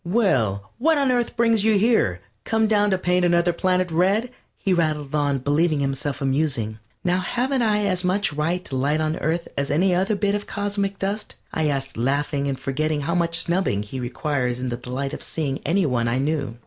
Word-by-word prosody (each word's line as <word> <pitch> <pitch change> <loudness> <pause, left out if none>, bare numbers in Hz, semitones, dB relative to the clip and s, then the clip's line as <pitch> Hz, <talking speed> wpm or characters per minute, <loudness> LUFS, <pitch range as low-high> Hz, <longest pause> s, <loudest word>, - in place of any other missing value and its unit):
"Well, 125 - +1
what 320 +4 +3
on 275 -2 +2
Earth 240 -1 0
brings 230 -3 +3
you 220 -1 +4
here? 195 - +2 0.2
Come 225 0 +1
down 210 -1 +3
to 190 - +2
paint 180 0 +1
another 175 0 +3
planet 185 0 +1
red?" 195 +9 +2 0.3
he 190 - 0
rattled 155 -4 0
on, 145 -2 +1
believing 145 +4 +1
himself 135 0 -2
amusing. 130 -6 0 0.2
"Now 180 0 +2
haven't 250 +7 0
I 210 -2 +2
as 185 -2 0
much 185 -1 +1
right 165 +5 -1
to 135 - -5
light 140 +4 +1
on 155 +1 0
Earth 165 +2 -1
as 140 0 -1
on - - +1
any 180 +3 +3
other 190 +4 +1
bit 200 0 0
of 205 0 -3
cosmic 200 -1 -2
dust?" 200 +2 -3 0.2
I 160 -1 +1
asked, 135 -3 -2
laughing 140 +3 0
and 135 -2 -2
forgetting 150 +3 -1
how 170 +4 -1
much 170 -2 +2
snubbing 170 - 0
he 120 +5 -7
requires 125 0 -2
in 130 0 -2
the 120 - -3
delight 130 +3 -4
of - - -6
seeing 145 -4 -3
any 185 +2 +2
one 120 -4 0
I 120 +2 +1
knew. 140 -4 -1
165 Hz, 205 wpm, -23 LUFS, 135-195 Hz, 0.3 s, you